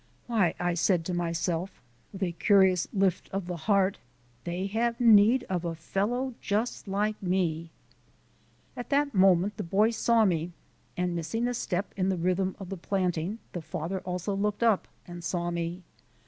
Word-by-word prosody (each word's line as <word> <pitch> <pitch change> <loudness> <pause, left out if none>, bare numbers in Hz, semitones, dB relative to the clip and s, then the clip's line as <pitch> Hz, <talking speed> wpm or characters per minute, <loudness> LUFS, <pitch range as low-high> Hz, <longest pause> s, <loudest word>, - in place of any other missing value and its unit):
"Why," 215 -8 +1
I 175 0 0
said 170 0 +1
to 180 - -2
myself 175 +1 -2 0.3
with 195 0 -5
a 180 - 0
curious 185 0 +3
lift 195 -4 0
of 195 -1 -3
the 180 0 -4
heart, 195 +2 +1 0.5
"they 175 +2 -2
have 230 +4 -1
need 230 +1 +6
of 180 -5 -3
a 170 -1 -3
fellow 235 +10 -2
just 215 +2 -2
like 210 +2 -1
me." 175 -3 -1 1.1
At 245 - -7
that 285 0 +1
moment 190 +1 +4
the 210 - -3
boy 205 +6 +2
saw 230 0 +3
me 175 -2 0 0.4
and, 180 -1 -1
missing 225 +9 -1
a 245 - -1
step 195 -4 -2
in 190 -1 0
the 190 - 0
rhythm 185 +2 0
of 195 -3 -8
the 195 - -5
planting, 180 +1 -1 0.2
the 175 - -4
father 165 +4 -4
also 180 +2 -3
looked 205 +2 -1
up 225 -4 +3 0.2
and 175 -1 -9
saw 175 +1 -2
me. 170 +1 -3
190 Hz, 170 wpm, -28 LUFS, 175-210 Hz, 1.1 s, need